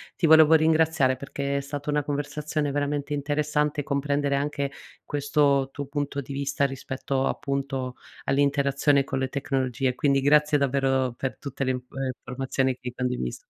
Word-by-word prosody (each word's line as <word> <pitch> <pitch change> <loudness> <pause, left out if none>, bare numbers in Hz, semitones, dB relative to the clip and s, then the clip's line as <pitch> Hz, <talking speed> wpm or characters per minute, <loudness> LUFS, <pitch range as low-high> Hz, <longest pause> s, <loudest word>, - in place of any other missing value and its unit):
ti 175 - 0
volevo 160 0 +7
ringraziare 160 -4 +4
perché 140 0 -3
è - - -1
stata 145 +1 -6
una 150 0 +1
conversazione 145 +1 -2
veramente 145 0 -1
interessante, 150 +1 0
comprendere 140 0 0
anche 140 0 -1 0.3
questo 145 -1 +1
tuo 145 -1 -5
punto 145 -1 -3
di 140 - -10
vista 140 0 0
rispetto, 135 0 -2
appunto 135 -3 -2 0.3
all'interazione 140 0 +2
con 135 0 -3
le 130 - 0
tecnologie. 130 -2 -1
Quindi 140 -2 +2
grazie 150 +1 +4
davvero 135 -2 +1
per 135 - -3
tutte 140 -1 -4
le 130 - +1
in 125 - -1
e 135 +2 -6
informazioni 130 +1 -1
che - - -36
hai 125 -1 -5
condiviso. 125 - -2
140 Hz, 155 wpm, -26 LUFS, 135-145 Hz, 0.3 s, volevo